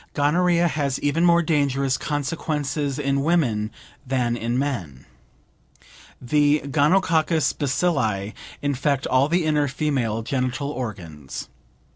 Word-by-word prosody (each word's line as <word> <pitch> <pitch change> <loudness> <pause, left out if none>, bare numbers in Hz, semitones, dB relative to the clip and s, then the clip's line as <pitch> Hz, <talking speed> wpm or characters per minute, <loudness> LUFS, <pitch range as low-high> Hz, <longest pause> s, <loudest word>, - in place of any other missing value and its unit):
Gonorrhea 170 +4 +3
has 140 -3 -1
even 145 +4 +1
more 170 -1 +5
dangerous 140 -4 +1
consequences 145 -1 -2
in 140 -1 0
women 135 -10 +1 0.3
than 125 -2 0
in 120 +1 -2
men. 95 - -3 1.1
The 145 +3 +2
gonococcus 160 +2 +2
bacilli 125 - 0 0.3
infect 140 0 0
all 130 +3 +2
the 170 0 +1
inner 150 -2 +2
female 130 -6 -1
genital 130 +2 -2
organs. 85 - -6
140 Hz, 105 wpm, -23 LUFS, 125-150 Hz, 1.1 s, more